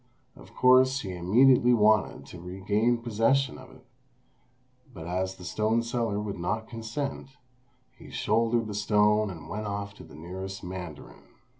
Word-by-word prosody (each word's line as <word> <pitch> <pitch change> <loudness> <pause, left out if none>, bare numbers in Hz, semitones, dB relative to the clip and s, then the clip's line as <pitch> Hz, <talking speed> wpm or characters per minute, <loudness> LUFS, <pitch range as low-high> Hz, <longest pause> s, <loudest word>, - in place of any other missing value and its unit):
Of - - -16
course 130 +1 +5
he 95 -2 -5
immediately 120 +8 +4
wanted 105 -9 +2
to 85 +4 -11
regain 100 +6 0
possession 120 +5 +1
of 130 - -13
it; - - -18 1.1
but 80 -9 -9
as 95 +2 -2
the 90 - -13
stone 110 +5 0
seller 115 -3 -1
would 105 -3 -5
not 110 +6 -2
consent, 135 +4 -5 0.6
he - - -14
shouldered 115 +2 +1
the 105 - -6
stone 105 +1 +2
and 80 -4 -9
went 105 +5 -4
off 100 0 -4
to - - -11
the - - -14
nearest 95 +5 -7
mandarin. 90 -4 -8
105 Hz, 150 wpm, -27 LUFS, 95-115 Hz, 1.1 s, course